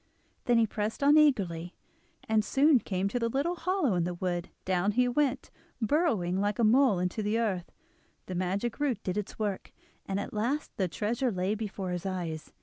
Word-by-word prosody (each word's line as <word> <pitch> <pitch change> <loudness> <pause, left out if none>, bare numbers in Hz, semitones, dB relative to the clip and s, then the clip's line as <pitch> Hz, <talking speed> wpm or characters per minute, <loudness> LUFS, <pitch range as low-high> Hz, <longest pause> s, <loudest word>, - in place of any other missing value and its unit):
Then 240 -1 +4
he 230 - +5
pressed 215 +4 -3
on 290 +2 +6
eagerly, 190 - +2 0.5
and 220 -1 +3
soon 280 +3 +4
came 190 -3 -2
to 245 - -1
the 230 -1 0
little 280 +8 0
hollow 365 - 0
in 175 -2 +1
the 175 +1 -2
wood; 175 0 -2 0.2
down 185 +2 +1
he 250 +2 +3
went, 265 +1 0 0.3
burrowing 220 - +1
like 205 0 0
a 235 - +1
mole 240 -1 +5
into 180 +4 -1
the 210 +2 0
earth; 195 -7 -1 0.5
the 185 - -6
magic 190 +7 -2
root 265 -8 -1
did 185 - -2
its 210 -2 -4
work, 205 -3 -3 0.4
and 195 0 -1
at - - -5
last 245 +8 -1
the 190 - 0
treasure 235 +8 -1
lay 185 +1 -1
before 200 -4 -4
his 180 +2 -3
eyes. 170 -4 -4
210 Hz, 190 wpm, -29 LUFS, 185-250 Hz, 0.5 s, on